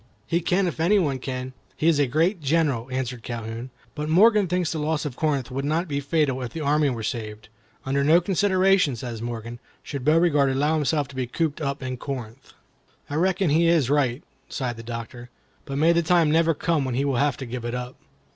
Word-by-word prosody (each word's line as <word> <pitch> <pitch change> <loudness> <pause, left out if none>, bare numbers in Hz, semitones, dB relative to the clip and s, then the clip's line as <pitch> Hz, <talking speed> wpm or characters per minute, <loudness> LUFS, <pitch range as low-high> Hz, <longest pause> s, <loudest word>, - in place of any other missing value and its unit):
"He 170 +1 0
can 185 +3 +1
if 175 - -3
any 180 +6 +4
one 145 -8 0
can. 130 0 -5 0.2
He 155 - 0
is 160 -3 +4
a 145 - +3
great 165 - +1
general," 140 -5 0
answered 125 -2 -3
Calhoun. 115 +1 -6 0.2
"But 150 0 -4
Morgan 210 +4 +5
thinks 180 -1 0
the 160 - -3
loss 150 0 -1
of 140 -4 -4
Corinth 140 -5 -1
would 135 +2 -3
not 160 +5 0
be 140 -2 -2
fatal 140 -2 0
if 125 -2 -5
the 165 - -5
army 150 0 +2
were 115 -4 -4
saved. 110 -1 -5 0.4
'Under 140 +1 +1
no 160 +4 +6
consideration,' 185 -4 +2
says 115 -1 -6
Morgan, 115 0 -6 0.2
'should 140 -3 -6
Beauregard 150 -2 +3
allow 145 +4 +1
himself 150 -2 0
to 140 - -12
be 130 -1 -2
cooped 160 +4 -2
up 140 -1 -3
in 130 -1 -4
Corinth.' 125 -2 -7 0.3
" - - -36
"I - - -2
reckon 185 -1 +1
he 165 +3 +4
is 160 -6 +3
right," 135 -3 +1 0.3
sighed 125 -3 -3
the - - -7
Doctor; 115 +1 -7 0.4
"but 140 -1 -4
may 160 +3 +4
the 170 - +3
time 170 -2 +3
never 165 0 +3
come 160 -1 0
when 130 -2 -2
he 135 +2 0
will 135 -3 0
have 140 0 +1
to 135 - -6
give 120 0 -6
it 120 +1 -3
up." 125 0 -5
140 Hz, 220 wpm, -24 LUFS, 125-165 Hz, 0.4 s, no